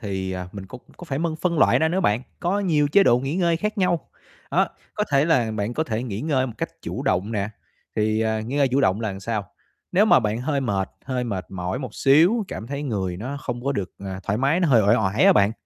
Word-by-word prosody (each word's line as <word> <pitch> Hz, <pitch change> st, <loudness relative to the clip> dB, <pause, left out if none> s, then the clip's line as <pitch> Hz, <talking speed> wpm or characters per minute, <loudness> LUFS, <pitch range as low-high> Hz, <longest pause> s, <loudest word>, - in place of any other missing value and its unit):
thì, 95 Hz, -3 st, -3 dB
à, 90 Hz, -1 st, -5 dB
mình 100 Hz, -2 st, -8 dB
có 125 Hz, -, -10 dB, 0.2 s
có 175 Hz, -, -10 dB
phải 135 Hz, -4 st, -3 dB
mân 165 Hz, -1 st, -1 dB
phân 170 Hz, -1 st, -1 dB
loại -, -, +5 dB
ra 160 Hz, -, +2 dB
nữa 185 Hz, +3 st, 0 dB
bạn, 105 Hz, -, +1 dB, 0.2 s
có 190 Hz, +4 st, 0 dB
nhiều 150 Hz, -7 st, +2 dB
chế 200 Hz, +7 st, +5 dB
độ 120 Hz, -10 st, +4 dB
nghỉ 135 Hz, +5 st, -3 dB
ngơi 170 Hz, -3 st, +2 dB
khác 210 Hz, +5 st, -3 dB
nhau. 180 Hz, -3 st, 0 dB, 0.4 s
Đó, -, -, +2 dB, 0.3 s
có 210 Hz, -, 0 dB
thể 140 Hz, +1 st, +4 dB
là 130 Hz, -9 st, +2 dB
bạn 110 Hz, +2 st, -3 dB
có 160 Hz, -, 0 dB
thể 115 Hz, -4 st, -2 dB
nghỉ 110 Hz, -4 st, -4 dB
ngơi 135 Hz, -4 st, +1 dB
một 120 Hz, -, -6 dB
cách -, -, -2 dB
chủ -, -, -4 dB
động 100 Hz, +5 st, 0 dB
nè, 100 Hz, -2 st, -1 dB, 0.5 s
thì, 110 Hz, 0 st, +1 dB
à, 110 Hz, 0 st, 0 dB
nghỉ 120 Hz, +6 st, -4 dB
ngơi 140 Hz, -2 st, +3 dB
chủ 130 Hz, +2 st, +1 dB
động 100 Hz, -4 st, +2 dB
là 110 Hz, -, -1 dB
làm 95 Hz, -, -7 dB
sao? 105 Hz, -2 st, -3 dB, 0.4 s
Nếu 190 Hz, +4 st, +5 dB
mà 215 Hz, -, +6 dB
bạn 110 Hz, 0 st, -1 dB
hơi 140 Hz, +2 st, -1 dB
mệt, 100 Hz, -6 st, -1 dB
hơi 130 Hz, -2 st, -2 dB
mệt 100 Hz, -6 st, -4 dB
mỏi 90 Hz, +3 st, -3 dB
một 130 Hz, -6 st, -6 dB
xíu, 170 Hz, -, +4 dB
cảm 110 Hz, -, -6 dB
thấy 140 Hz, +3 st, -4 dB
người 95 Hz, -10 st, -2 dB
nó 130 Hz, +9 st, -5 dB
không 120 Hz, -1 st, -5 dB
có 140 Hz, -, +1 dB
được, 100 Hz, -8 st, -3 dB
à, 95 Hz, -1 st, -6 dB
thoải 100 Hz, +3 st, -1 dB
mái, 140 Hz, +8 st, +2 dB
nó 175 Hz, -, +2 dB
hơi 120 Hz, -5 st, +5 dB
uể 100 Hz, -, +4 dB
oải 100 Hz, -1 st, +2 dB
á -, -, +8 dB
bạn, 100 Hz, +1 st, +3 dB
125 Hz, 265 wpm, -23 LUFS, 105-155 Hz, 0.5 s, á